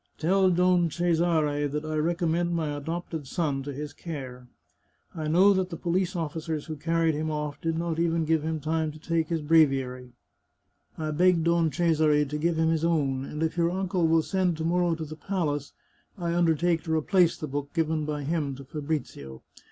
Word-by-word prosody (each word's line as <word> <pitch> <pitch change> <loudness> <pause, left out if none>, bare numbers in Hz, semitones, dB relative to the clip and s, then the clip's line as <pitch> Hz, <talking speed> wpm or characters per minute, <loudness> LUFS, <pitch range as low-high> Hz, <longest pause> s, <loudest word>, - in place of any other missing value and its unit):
" - - -42
Tell 190 +3 +3
Don 180 -1 +3
Cesare 160 -3 +1
that 150 +2 -4
I 155 0 -3
recommend 170 +2 0
my 155 -3 -1
adopted 160 0 -5
son 145 -3 -1
to 145 +1 -5
his 145 +1 -6
care. 130 -7 -7 0.7
I 155 -2 -4
know 185 +6 +5
that 190 -1 0
the 165 - -6
police 180 +2 -1
officers 160 -1 -3
who 160 - -5
carried 165 +1 +1
him 155 +1 -2
off 150 -1 -4
did 165 -1 -1
not 165 -1 -2
even 165 -1 +1
give 160 0 +2
him 160 +1 -2
time 160 +1 -1
to - - -11
take 165 0 -1
his 165 -3 -1
breviary; 135 -5 +2 0.8
I 155 -1 -2
beg 175 +1 +3
Don 170 -1 +2
Cesare 155 -3 +2
to 150 +2 -4
give 165 +1 0
him 160 0 +2
his 160 -1 0
own, 140 -6 +1
and 150 +3 -4
if 160 +2 -1
your 170 0 +3
uncle 185 -2 0
will 160 0 +3
send 185 -3 0
to 160 - -3
morrow 175 0 +1
to 160 -1 -5
the 155 +1 -8
palace, 155 -6 -2 0.5
I 170 -2 -2
undertake 170 0 +2
to 160 -1 0
replace 170 +2 +3
the - - -5
book 140 0 -4
given 160 -2 0
by 150 -1 -3
him 145 -2 -1
to 140 - -10
Fabrizio. 140 - -5
160 Hz, 195 wpm, -27 LUFS, 150-170 Hz, 0.8 s, know